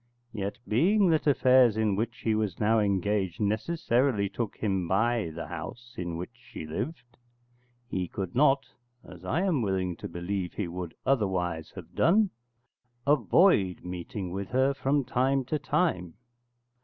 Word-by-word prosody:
Yet, 100 +1 -3
being 185 - +3
that 155 -1 +1
affairs 130 -5 +5
in 110 -3 +2
which 115 +3 -3
he 110 - +1
was 105 -4 -1
now 110 +1 +3
engaged 100 -3 0
necessarily 115 0 +1
took 110 +1 -4
him 95 -4 -1
by 110 +1 +1
the - - -6
house 120 0 -8
in 85 -2 -4
which 90 +6 -6
she 120 -9 -10
lived, 120 - -4 0.8
he 90 -6 -2
could 95 0 -5
not 135 +1 +4 0.4
(as 90 0 -13
I 130 - 0
am 175 -9 +1
willing 95 -4 -1
to - - -6
believe 90 +1 -3
he - - -3
would 85 -1 -6
otherwise 90 -10 0
have - - -10
done) 200 +4 +3 0.7
avoid 145 - +3
meeting 90 +1 -5
with 100 +1 -4
her 130 +2 +2
from 140 0 0
time 130 +2 +1
to 150 +4 -1
time. 135 - 0
110 Hz, 150 wpm, -28 LUFS, 95-135 Hz, 0.8 s, affairs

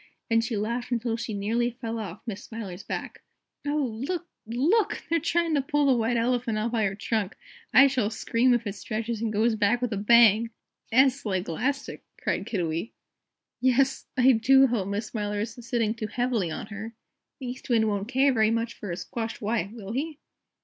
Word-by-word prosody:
and 230 0 +4
she 235 -2 -2
laughed 235 +4 -2
until 235 -1 0
she 230 0 -4
nearly 220 +4 0
fell 230 -1 -3
off 205 -3 -7
Miss 215 -2 -5
Smiler's 205 -5 -7
back. - - -6 0.5
"Oh, 290 -1 +1 0.2
look! 350 +4 -2 0.2
LOOK! 360 - +1
They're 335 +1 +2
trying 335 +1 +1
to 285 - +3
pull 290 +2 +1
the 270 - +5
White 235 0 +1
Elephant 235 -1 0
out 220 +2 -1
by 225 -3 +1
her 195 0 -1
trunk! 215 -1 -2 0.4
I 270 - +8
shall 255 -6 +1
scream 230 +3 +1
if 235 -1 -2
it 205 - -3
stretches 220 +2 -4
and 225 -2 -1
goes 220 +2 +2
back 220 +2 +2
with 245 -2 -1
a - - -2
bang!" 230 +1 +5 0.4
"'Es, 265 +3 +4
like 190 -3 -1
'lastic," 260 - -2 0.2
cried - - -2
Kiddiwee. 170 0 -2 0.7
"Yes! 260 +2 +2
I 255 +1 +6
do 265 +3 +6
hope 230 -7 0
Miss 200 +2 -2
Smiler 210 -2 -3
isn't 225 +2 -5
sitting 230 -2 0
too 225 -2 -4
heavily 240 -6 0
on 155 - -5
her; 220 +3 -7 0.4
the 265 - -6
East 250 +2 -7
Wind 225 -2 +3
won't 205 -1 -1
care 265 +2 +3
very 220 -2 +3
much 230 +1 -1
for 205 - -8
a 170 - -3
squashed 225 +4 -5
wife, 215 -3 -1
will 215 -3 -8
he?" 295 +5 -3
230 Hz, 195 wpm, -27 LUFS, 215-250 Hz, 0.7 s, I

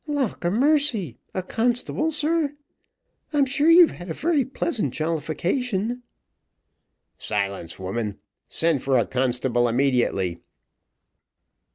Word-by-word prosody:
"Lauk 285 -11 -2
a 175 - +2
mercy! 245 - +2
a 185 - -3
constable, 245 - 0
sir? 305 -1 +1 0.8
I'm 285 -2 +4
sure 280 +4 +2
you've 340 0 +8
had 175 0 -10
a 160 - -3
very 315 -4 +1
pleasant 235 - -2
jollification." 185 - -2 1.2
"Silence, 100 -4 -2
woman; 100 +2 -4 0.3
send 165 -5 +1
for 135 -1 +2
a 115 - +2
constable 125 +1 +1
immediately." 120 -8 +1
185 Hz, 105 wpm, -24 LUFS, -, 1.2 s, you've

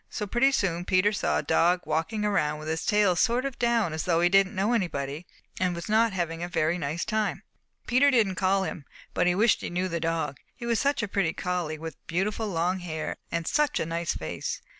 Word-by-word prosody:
So 210 - -4
pretty 240 +6 +3
soon 175 -9 0
Peter 185 +3 +2
saw 205 - 0
a - - -1
dog 175 +4 +3
walking 165 +8 -1
around 155 -7 +1
with 155 +1 -8
his 160 0 -2
tail 210 -4 +3
sort 240 +7 +2
of 275 -2 -5
down 235 -8 +1
as 155 - -3
though 170 -2 +2
he 175 +1 +4
didn't 195 +1 +3
know 200 +5 +1
anybody 155 - -2 0.3
and 180 -1 +1
was 170 - -6
not 220 +1 +3
having 170 -3 -3
a 175 - -3
very 165 +1 0
nice 155 +2 -2
time. 215 -1 -1 0.4
Peter 260 +4 +4
didn't 225 -8 +3
call 190 +1 +1
him, 155 -6 -5 0.3
but - - +2
he 180 - +3
wished 215 +3 +3
he - - -4
knew 180 +2 -1
the 170 -2 -2
dog, 160 -4 -2 0.2
he 240 - -8
was 235 -1 +1
such 280 -4 +1
a - - -1
pretty 190 -5 0
collie 175 -4 -2
with 160 0 -7
beautiful 205 +6 -1
long 180 0 0
hair 160 -3 -4
and 170 0 -2
such 300 - +1
a - - -1
nice 165 +1 -2
face. 80 - -4
180 Hz, 225 wpm, -27 LUFS, 165-215 Hz, 0.4 s, he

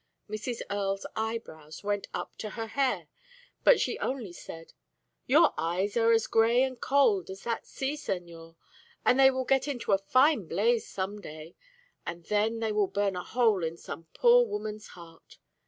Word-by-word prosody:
Mrs. 220 +3 -4
Earle's 195 -1 -2
eyebrows 210 -9 -5
went 205 0 -1
up - - -5
to 215 - -5
her 225 +1 -5
hair, 270 +3 -1 0.6
but - - +6
she - - -1
only 245 -9 -3
said: 165 -1 -10 0.5
"Your - - +5
eyes 180 +5 -1
are 230 -1 +4
as 225 -1 +3
grey 230 +3 +3
and 255 -2 -3
cold 240 -10 +3
as 190 +1 -8
that 230 -1 -3
sea, 270 +1 -3
señor; 170 - -6 0.5
but 250 - +4
they 270 0 +7
will 260 -1 -2
get 270 +2 +2
into 245 -6 -3
a 195 - +4
fine 255 - +3
blaze 225 +7 +1
some 200 +2 -4
day, 155 -1 -10 0.5
and 170 0 -6
then 220 +2 0
they 220 -1 0
will 210 -2 +2
burn 200 -1 -1
a 180 - -4
hole 220 -4 +2
in 165 +1 -3
some 165 -1 -9
poor - - +6
woman's 215 - -5
heart. 165 -2 -15
210 Hz, 170 wpm, -29 LUFS, 185-240 Hz, 0.6 s, they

